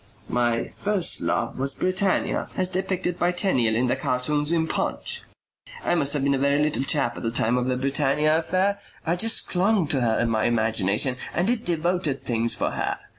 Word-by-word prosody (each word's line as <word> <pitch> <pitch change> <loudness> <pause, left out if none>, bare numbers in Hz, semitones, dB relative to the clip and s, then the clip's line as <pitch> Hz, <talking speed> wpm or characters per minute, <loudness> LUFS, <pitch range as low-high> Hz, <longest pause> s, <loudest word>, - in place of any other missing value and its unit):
"My 120 -1 0
first 200 -3 0
love - - -1
was 135 +1 +1
Britannia 185 +1 0
as 185 0 +1
depicted 185 -1 -2
by 175 - +2
Tenniel 130 - +1
in 120 +3 +1
the 125 - +1
cartoons 145 +4 0
in 165 -1 +1
PUNCH. - - -3 0.6
I - - +2
must 145 -5 +1
have 145 -2 0
been 140 0 +2
a 135 - 0
very 140 +1 +2
little 150 -2 +1
chap 135 -4 0
at - - -6
the 115 - -1
time 115 0 +1
of 125 0 0
the 130 -1 0
Britannia 145 +3 +2
affair. 190 +4 0 0.3
I 170 +1 +1
just 225 +5 +2
clung 190 0 +2
to 135 - +1
her 115 -2 +1
in 120 - +1
my 110 -1 +1
imagination 110 +1 +1 0.2
and 175 - +1
did 235 +1 0
devoted 170 -4 -1
things 115 -1 0
for - - -1
her. - - -2
145 Hz, 195 wpm, -24 LUFS, 125-180 Hz, 0.6 s, by